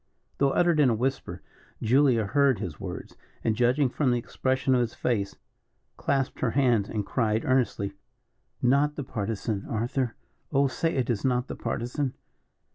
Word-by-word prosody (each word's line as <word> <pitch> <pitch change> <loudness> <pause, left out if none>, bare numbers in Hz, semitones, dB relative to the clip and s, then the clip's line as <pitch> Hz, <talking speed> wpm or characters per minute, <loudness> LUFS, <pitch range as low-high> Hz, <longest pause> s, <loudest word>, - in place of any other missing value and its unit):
Though 140 - +4
uttered 170 +2 +3
in 140 -4 +5
a 115 - +2
whisper, 130 +4 -2 0.4
Julia 125 -1 +3
heard 140 +3 +3
his 80 -4 -6
words, - - -7 0.3
and 110 - +1
judging 125 +4 +3
from 130 +2 0
the 120 - +2
expression 130 +2 0
of 125 - +4
his 115 -2 -2
face, 100 -5 -1 0.6
clasped 135 -2 -1
her 125 - +1
hands, 120 -5 +2
and 105 -2 -2
cried, 110 -3 0
earnestly: 120 -6 +1 0.7
"Not 140 +4 +3
the 145 - -4
Partisan, 105 -2 -3
Arthur 120 +2 -1 0.4
oh, 140 -1 +3
say 160 +5 -1
it 130 -2 +1
is 110 - -2
not 125 -1 +1
the - - -5
Partisan." 125 +3 -2
125 Hz, 160 wpm, -27 LUFS, 115-135 Hz, 0.7 s, in